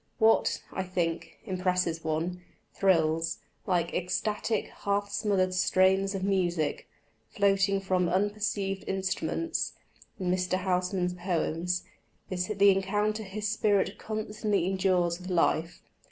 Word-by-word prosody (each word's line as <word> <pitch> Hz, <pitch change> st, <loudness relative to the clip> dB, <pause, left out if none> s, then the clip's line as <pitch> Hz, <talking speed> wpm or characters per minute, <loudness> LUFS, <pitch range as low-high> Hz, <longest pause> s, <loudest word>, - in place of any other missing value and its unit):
What, 225 Hz, -1 st, +3 dB
I -, -, -1 dB
think, 175 Hz, -3 st, -2 dB
impresses 180 Hz, -4 st, 0 dB
one, 165 Hz, +3 st, -2 dB, 0.3 s
thrills, 165 Hz, -3 st, +2 dB, 0.3 s
like 175 Hz, -3 st, +1 dB
ecstatic, 210 Hz, +4 st, -1 dB
half 200 Hz, 0 st, -1 dB
smothered 200 Hz, -3 st, +1 dB
strains 190 Hz, +2 st, +3 dB
of 190 Hz, -, -3 dB
music, 175 Hz, -6 st, 0 dB, 0.4 s
floating 195 Hz, -1 st, +2 dB
from 185 Hz, -2 st, +1 dB
unperceived 200 Hz, 0 st, -1 dB
instruments, 190 Hz, -, -1 dB, 0.5 s
in 180 Hz, -2 st, 0 dB
Mr. 180 Hz, 0 st, +1 dB
Housman's 180 Hz, 0 st, 0 dB
poems, 180 Hz, -1 st, -1 dB, 0.5 s
is 180 Hz, -1 st, -1 dB
the 200 Hz, -1 st, +5 dB
encounter 205 Hz, +3 st, 0 dB
his 210 Hz, +1 st, -4 dB
spirit 205 Hz, -2 st, +1 dB
constantly 215 Hz, -3 st, -1 dB
endures 185 Hz, -2 st, +1 dB
with 185 Hz, +1 st, -8 dB
life. 170 Hz, -1 st, +1 dB
190 Hz, 110 wpm, -29 LUFS, 180-200 Hz, 0.5 s, the